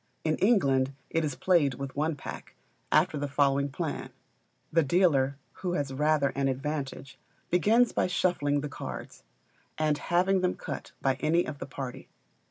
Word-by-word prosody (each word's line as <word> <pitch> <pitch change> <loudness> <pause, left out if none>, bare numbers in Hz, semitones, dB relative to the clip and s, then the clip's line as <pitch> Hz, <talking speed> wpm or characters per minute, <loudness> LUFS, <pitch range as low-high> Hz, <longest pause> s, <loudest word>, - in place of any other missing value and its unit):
In 155 -1 +1
England 140 - +3 0.2
it 165 - +1
is 145 -3 -2
played 160 -8 +3
with 135 0 -6
one 155 +2 0
pack, - - -9 0.4
after 155 -1 +3
the 145 - -1
following 140 0 +2
plan: 135 - -4 0.6
The 165 - +5
dealer, 140 -4 +3 0.2
who 180 -2 -1
has 140 -5 -2
rather 150 0 +2
an 135 0 -1
advantage, 135 0 -4 0.3
begins 225 +7 +4
by - - +1
shuffling 145 -6 +1
the 150 - -3
cards, - - -7 0.6
and 155 -1 +1
having 185 +2 +2
them 180 0 +1
cut - - -6
by 135 -1 +2
any 170 +3 +2
of 145 -2 -6
the 130 - -6
party. 135 -1 -7
150 Hz, 160 wpm, -29 LUFS, 140-175 Hz, 0.6 s, The